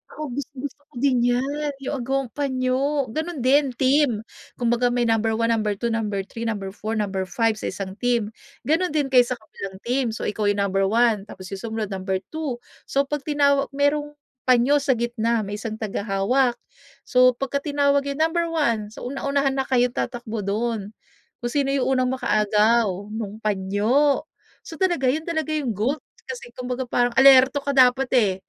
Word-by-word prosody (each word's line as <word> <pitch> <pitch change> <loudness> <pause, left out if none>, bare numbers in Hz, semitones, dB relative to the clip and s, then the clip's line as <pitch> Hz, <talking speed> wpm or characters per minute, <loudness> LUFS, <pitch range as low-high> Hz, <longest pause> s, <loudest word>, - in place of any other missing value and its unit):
Oo, 300 -4 -5
gustong-gusto 280 +1 -6
ko - - -34
din 260 -3 +3
'yan, 270 +5 0
yung 285 - -2
agawang 265 0 -1
panyo, 270 -1 0
gano'n 315 -3 -4
din, 270 -1 +3
team. 260 -4 +2 0.3
Kumbaga 240 0 +1
may 245 0 +1
number 225 -1 +1
1, 230 +1 +1
number 215 -2 0
2, 235 +3 -2
number 210 -3 -1
3, 230 +3 -6
number 200 -3 -3
4, 215 +2 -4
number 195 -3 -2
5, 220 +3 0
sa - - -3
isang 190 -1 -5
team. 235 -4 0 0.3
Gano'n 320 +4 +1
din 280 -3 0
kayo 250 -2 +6
sa 250 - -2
kabilang 195 -4 -9
team. 255 +2 0
So, - - -6
ikaw 210 0 -1
yung 205 0 +2
number 195 0 +1
1, 220 -2 +2
tapos 185 -2 -10
yung 195 - -5
sumunod 220 -2 -4
number 190 0 -2
2. 310 -6 -3 0.3
So, 275 - +2
'pag 290 +1 -5
tinawag 280 -1 +3
merong 290 +1 0 0.3
panyo 255 +4 +4
sa 270 -2 +1
gitna, 235 -1 0
may 205 +1 -5
isang 220 -1 -4
tagahawak. 215 +4 0 0.5
So, 255 0 +4
pagka 275 +2 -2
tinawag 280 -1 +1
yung 280 +2 -2
number 335 +1 +1
1, 235 -11 0
so, - - -9
una-unahan 275 +1 -1
na 265 - -1
kayong 250 -1 +2
tatakbo 240 -3 -4
dun. 210 +1 -2 0.5
Kung 240 - -2
sino 280 -2 +1
yung 275 -1 +1 0.2
unang 255 +1 +1
makaagaw 210 -3 +2
nung 215 0 -6
panyo. 215 +9 +2 0.4
So, 325 - -10
talaga, 340 -9 +2
yun 315 +4 -4
talaga 315 -2 -2
yung 275 -8 -1
goal 250 +10 0 0.3
kasi 250 -2 -7
kumbaga 250 +1 -3
parang 245 0 +1
alerto 265 +1 +7
ka 280 0 -3
dapat 260 0 +5
eh, 205 -6 +3
245 Hz, 175 wpm, -23 LUFS, 215-280 Hz, 0.5 s, alerto